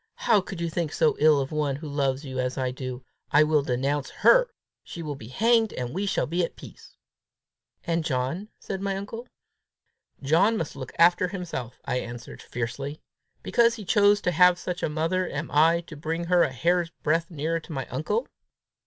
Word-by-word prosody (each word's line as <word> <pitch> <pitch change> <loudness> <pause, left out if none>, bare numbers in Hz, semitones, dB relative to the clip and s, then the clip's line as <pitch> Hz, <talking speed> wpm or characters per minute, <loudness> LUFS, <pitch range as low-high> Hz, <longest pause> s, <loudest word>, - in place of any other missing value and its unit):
"How 220 -4 +3
can 190 0 -8
you 170 0 -2
think 165 -1 -2
so 155 - +2
ill 150 -1 +5
of 135 -1 -3
one 150 -3 0
who 150 +3 -7
loves 140 -1 -1
you 130 -1 -5
as 125 0 -2
I 130 -1 -1
do! 130 -1 -6 0.2
I 150 +1 +5
will 150 -1 +3
denounce 135 +2 -1
her! - - +4 0.3
She 170 - -8
will 150 -2 -3
be 125 -6 -10
hanged, 225 - +2
and 125 0 -4
we 200 +4 -2
shall 195 - +1
be 170 +3 0
at - - -4
peace!" - - -14 0.9
"And 165 -1 0
John?" 145 +8 -2
said 195 -1 -5
my 195 -1 -1
uncle. 225 +5 -7 1.0
"John 170 +11 +3
must 160 -6 -4
look 130 -2 -7
after 175 +2 +5
himself!" 170 - -6
I 125 - 0
answered 120 0 -8
fiercely. 135 +5 -5 0.4
"Because 235 -1 +3
he 215 -4 -9
chooses 205 +1 +4
to 180 - +1
have 180 +1 +5
such 180 -1 -5
a - - 0
mother, 165 +4 -1
am 150 +2 -5
I 165 +3 +4
to 165 -2 -11
bring 160 +3 -3
her 175 0 +3
a - - +2
hair's 170 +6 +1
breadth 165 +2 +1
nearer 165 0 -2
to 165 - -13
my 135 -4 -3
uncle! 210 - -1
160 Hz, 195 wpm, -26 LUFS, 140-180 Hz, 1.0 s, ill